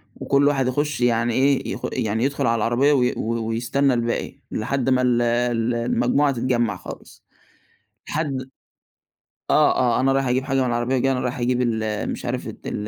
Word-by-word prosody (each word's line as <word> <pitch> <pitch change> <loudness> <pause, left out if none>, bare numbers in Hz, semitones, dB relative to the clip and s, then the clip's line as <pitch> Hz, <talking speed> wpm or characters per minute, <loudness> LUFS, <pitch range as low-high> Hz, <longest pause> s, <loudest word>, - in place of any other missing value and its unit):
وكُلّ 140 +1 +2
واحد 135 -3 +1
يخش 145 +1 -1
يعني 120 -1 +2
إيه، 135 +2 +1
يخ - - -7
يعني 110 +2 -1
يدخُل 140 -1 0
على 115 - +2
العربية 120 +6 +2
وي 125 -3 +2
و 115 0 -2
ويستنى 125 +4 +1
الباقي 120 -1 -2 0.2
لحد 130 +4 -1
ما 130 -1 +3
ال 125 -1 +2
ال 120 0 0
المجموعة 120 +4 +1
تتجمع 120 -4 0
خالص". - - -11 0.8
لحد 135 -4 -3 1.0
آه، - - +4 0.2
آه - - +1
أنا 135 +1 +2
رايح 135 -1 +1
أجيب 125 +1 +1
حاجة 135 -1 0
من - - +1
العربية 120 +2 0
وجاي 135 +1 +1
أنا 130 - 0
رايح 125 0 -3
أجيب 125 +1 0
ال 110 -3 -1
مش - - -6
عارف - - -3
ت - - -9
ال 105 - -4
125 Hz, 180 wpm, -22 LUFS, 115-135 Hz, 1.0 s, آه